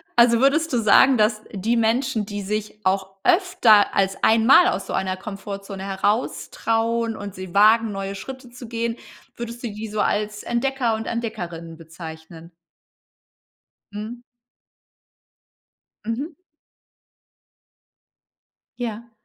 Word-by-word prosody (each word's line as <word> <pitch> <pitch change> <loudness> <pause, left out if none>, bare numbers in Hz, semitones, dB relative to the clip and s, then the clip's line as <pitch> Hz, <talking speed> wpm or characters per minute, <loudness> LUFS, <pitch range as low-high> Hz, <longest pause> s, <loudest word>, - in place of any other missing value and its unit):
also 235 -1 +5
würdest 290 +3 +2
du - - +3
sagen, 245 +5 +6
dass 215 0 +2
die 220 +4 0
Menschen, 230 0 +1
die 205 0 -5
sich 210 +1 -4
auch 190 0 0
öfter 360 - +4
als 195 -1 +1
einmal 230 +10 +6
aus - - -2
so - - -5
einer 185 -1 -1
Komfortzone 195 -1 -7
heraus 200 +4 -1
trauen 230 0 0
und 200 -2 -7
sie 185 -1 -8
wagen, 220 +2 +5
neue 195 0 -4
Schritte 260 +4 -9
zu 245 0 -11
gehen, 230 0 -3 0.4
würdest 235 +1 -7
du - - -1
die 215 +2 -6
so 210 0 -2
als 210 0 -1
Entdecker 240 -1 0
und 220 0 -5
Entdeckerinnen 175 -8 -5
bezeichnen? 160 0 -11 1.4
Mhm. 215 +4 -7 1.8
Mhm. 270 +9 -3 2.4
Ja. 235 -1 -5
220 Hz, 120 wpm, -22 LUFS, 195-235 Hz, 2.4 s, sagen